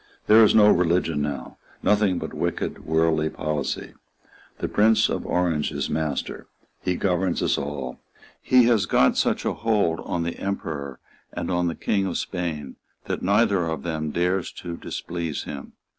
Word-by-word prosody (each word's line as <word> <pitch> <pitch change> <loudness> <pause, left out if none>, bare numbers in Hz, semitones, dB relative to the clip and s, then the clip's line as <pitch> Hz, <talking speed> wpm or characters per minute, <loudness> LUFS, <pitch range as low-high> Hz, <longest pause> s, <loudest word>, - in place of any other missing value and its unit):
There 110 +1 +7
is 110 - +5
no 105 -1 +7
religion 85 -3 +2
now, 70 -4 -4 0.2
nothing 105 -3 +3
but - - -5
wicked, - - -3
worldly 80 0 +2
policy. 75 -1 -3 0.6
The - - -2
Prince 110 +1 +4
of - - -3
Orange 85 -4 0
is - - -3
master. 80 -2 -3 0.3
He 90 - 0
governs 90 -1 0
us - - +2
all. 70 -3 -5 0.4
He 130 -1 +5
has 115 -5 +3
got 65 - +4
such - - +1
a - - +1
hold 105 -7 +1
on 85 -2 -2
the 85 0 -4
Emperor 75 -9 -4 0.3
and - - -4
on 90 0 +1
the 85 - -2
King 100 -2 0
of 90 - -2
Spain 80 -6 -4 0.3
that - - -3
neither 100 -2 +3
of 80 -4 -3
them 80 -2 -2
dares 90 +3 0
to 85 -1 -6
displease 85 -3 -4
him. 70 -2 -8
85 Hz, 160 wpm, -24 LUFS, 75-95 Hz, 0.6 s, There